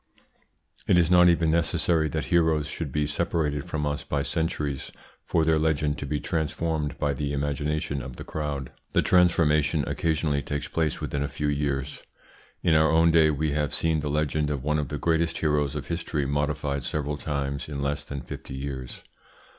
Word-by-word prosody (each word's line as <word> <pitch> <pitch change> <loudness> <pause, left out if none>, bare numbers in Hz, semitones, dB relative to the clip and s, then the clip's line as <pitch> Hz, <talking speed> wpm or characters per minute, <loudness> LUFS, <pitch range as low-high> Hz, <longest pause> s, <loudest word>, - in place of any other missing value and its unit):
It - - +5
is 85 0 +3
not 90 0 +7
even 85 -2 +3
necessary 80 -1 +2
that 80 0 -2
heroes 80 -3 +3
should 75 0 -5
be 75 +2 0
separated 75 -2 -1
from 75 -1 -2
us 75 0 -2
by 70 -1 -1
centuries 75 -4 -2 0.3
for 80 -1 +1
their 80 -1 +3
legend 75 -1 +1
to 70 - -4
be 75 +1 -1
transformed 80 -2 -2
by 75 -2 0
the 70 +1 -3
imagination 75 +1 -1
of 65 0 -8
the - - -8
crowd. 70 -4 -4 0.2
The - - +3
transformation 80 -4 +3
occasionally 80 -3 0
takes 75 +1 -3
place 80 -2 -1
within 70 - -2
a 70 - 0
few 75 +1 -2
years. 70 -1 -2 0.6
In 85 - +4
our 80 0 +5
own 80 +1 +5
day 80 -1 +5
we 75 0 0
have 75 0 -1
seen 80 -1 +1
the 75 0 -3
legend 75 0 0
of 70 -3 -3
one 75 +1 +1
of 75 - -2
the 75 - -4
greatest 80 +2 +1
heroes 75 -2 +1
of 75 - -4
history 80 -4 -2
modified 70 -1 -1
several 75 +2 -2
times 70 -1 -3
in 70 -2 -4
less 70 +1 -1
than 70 -1 -6
fifty 65 +2 -8
years. 65 -2 -6
75 Hz, 185 wpm, -26 LUFS, 70-80 Hz, 0.6 s, not